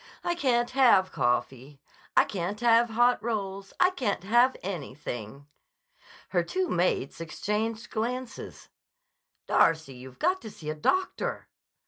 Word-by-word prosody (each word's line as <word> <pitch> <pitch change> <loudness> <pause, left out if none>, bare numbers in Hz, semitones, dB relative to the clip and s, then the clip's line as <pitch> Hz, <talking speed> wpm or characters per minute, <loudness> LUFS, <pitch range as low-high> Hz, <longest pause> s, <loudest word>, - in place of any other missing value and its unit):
"I 345 - 0
can't 245 -7 +1
have 235 -8 +4
coffee. 130 +3 -1 0.4
I - - +7
can't 195 +2 -4
have 235 0 +4
hot 240 +2 +3
rolls. 200 -3 -4
I 360 - +5
can't 240 - -2
have 240 +6 +3
anything." 140 - -6 0.8
Her 180 - +2
two 370 - -2
mates 175 -5 0
exchanged 215 +7 -3
glances. 245 +2 -4 0.8
"Darcy, 160 -4 +3
you've 125 0 -12
got 370 +3 +1
to 220 - -8
see 155 -6 -6
a - - -2
doctor." 370 - -1
205 Hz, 125 wpm, -28 LUFS, 155-240 Hz, 0.8 s, I